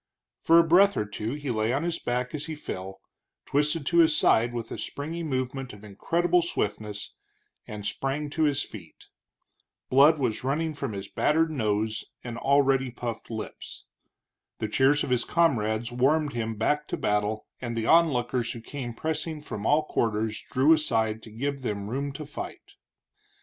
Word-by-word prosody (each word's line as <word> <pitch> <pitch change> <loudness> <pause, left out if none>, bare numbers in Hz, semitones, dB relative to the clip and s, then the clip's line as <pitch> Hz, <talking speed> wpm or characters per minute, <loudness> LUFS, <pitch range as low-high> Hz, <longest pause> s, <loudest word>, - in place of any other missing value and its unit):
For 165 - +5
a 170 - +8
breath 190 +5 +5
or 105 - 0
two 105 +3 -4
he 145 -3 -3
lay 110 0 0
on 135 +5 0
his 170 -1 -1
back 125 +1 -2
as 150 0 -4
he 160 - -4
fell, 95 -9 -7 0.4
twisted 150 +1 +1
to 170 +3 +3
his 160 -2 +5
side 120 -2 +4
with 115 -2 -5
a - - -4
springy 160 +4 -5
movement 130 -4 -3
of 105 0 -13
incredible 170 - +1
swiftness, 105 -10 -3 0.5
and 105 -1 -7
sprang 135 +7 -2
to 160 +1 +1
his 145 -1 +1
feet. 85 -7 -12 0.8
Blood 145 +4 +7
was 125 -6 -1
running 155 +4 0
from 140 -6 -4
his 100 0 -5
battered 160 +7 +2
nose 110 -5 -1 0.2
and 120 -1 -6
already 135 -1 +3
puffed 120 -2 -6
lips. 110 -2 -7 0.7
The 110 - -2
cheers 135 +6 +3
of - - -3
his 125 -1 +2
comrades 120 -9 +1
warmed 145 +4 +2
him 115 -1 -2
back 150 +7 0
to - - -3
battle, 105 +1 0 0.2
and 120 -2 -4
the 110 - -1
onlookers 125 -7 +3
who 115 - -8
came 120 -1 -6
pressing 160 +2 -3
from 110 -8 -5
all 150 +2 +4
quarters, 110 -4 -1
drew 140 +4 +5
aside 110 -8 +1
to 110 - -12
give 140 +5 -3
them 105 -3 -3
room 140 +2 -2
to 150 +2 -7
fight. 145 - -8
130 Hz, 170 wpm, -27 LUFS, 110-150 Hz, 0.8 s, a